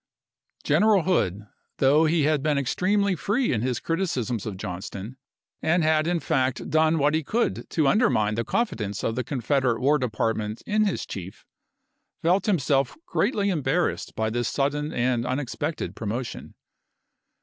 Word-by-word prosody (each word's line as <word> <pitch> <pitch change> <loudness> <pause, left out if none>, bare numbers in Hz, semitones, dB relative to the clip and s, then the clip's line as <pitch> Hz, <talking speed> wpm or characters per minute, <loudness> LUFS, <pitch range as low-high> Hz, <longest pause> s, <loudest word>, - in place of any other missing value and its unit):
General 210 -4 +4
Hood, 105 - +1 0.4
though 145 +4 +4
he 160 0 +2
had 150 -1 +2
been 150 0 +1
extremely 200 +9 +1
free 215 - 0
in 110 - 0
his 125 0 -1
criticisms 130 - -2
of 100 -3 -5
Johnston, 95 +6 -6 0.4
and 170 +1 +2
had 155 0 +2
in 175 0 +1
fact 130 -3 -1
done 160 +1 +3
what 145 0 +2
he 160 0 +1
could 230 - -1
to 155 -4 +1
undermine 135 - +3
the 115 +2 -1
confidence 110 - -2
of 115 - 0
the 125 +2 -2
Confederate 130 -1 0
War 145 +4 +3
Department 110 -2 -2
in 215 +1 +2
his 200 - -1
chief, 95 0 -8 0.8
felt 180 +5 +2
himself 140 -8 +1
greatly 200 -2 0
embarrassed 165 +1 -1
by 110 0 -1
this 120 0 -1
sudden 145 +2 -1
and 120 -1 0
unexpected 130 +4 -3
promotion. 115 +3 -5
140 Hz, 150 wpm, -25 LUFS, 115-170 Hz, 0.8 s, General